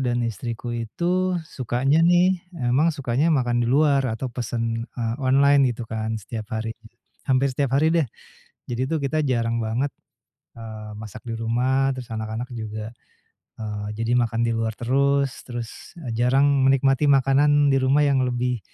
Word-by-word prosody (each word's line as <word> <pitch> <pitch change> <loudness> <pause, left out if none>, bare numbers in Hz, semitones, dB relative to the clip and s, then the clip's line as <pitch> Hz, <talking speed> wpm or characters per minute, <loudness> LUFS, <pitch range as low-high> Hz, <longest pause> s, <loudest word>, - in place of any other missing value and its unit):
dan 120 -2 0
istriku 115 +2 -4
itu 175 +11 -1
sukanya 135 +2 0
nih 175 +2 +4 0.2
emang 130 +3 +2
sukanya 140 0 0
makan 120 -6 +2
di 120 - 0
luar 140 0 +3
atau 120 +2 -4
pesen, 115 -1 -3
eee, 115 -1 -1
online 140 +1 +4
gitu 120 - -6
kan 110 0 -3
setiap 110 +1 -7
hari, 110 0 -3 0.6
hampir 130 +1 +2
setiap 135 0 0
hari 155 +3 +3
deh, 165 -4 +2 0.6
jadi 125 +2 -2
tuh 160 - 0
kita 155 +3 0
jarang 115 -2 0
banget, 120 +6 -1 0.6
eee, 110 -2 -8
masak 110 0 -9
di 115 - -2
rumah 130 +4 +1
terus 130 -2 -7
anak-anak 110 +2 -4
juga, 110 -1 -5 0.7
eee, 105 -1 -5
jadi 115 +1 -1
makan 115 -1 0
di 115 - +1
luar 115 -1 -2
terus 140 +2 +1
terus 120 -2 -5 0.4
jarang 125 +4 +3 0.2
menikmati 135 +2 +3
makanan 140 +1 +4
di 135 - +3
rumah 135 +3 +3
yang 140 -2 +3
lebih, 125 -1 -1
125 Hz, 155 wpm, -23 LUFS, 115-140 Hz, 0.7 s, nih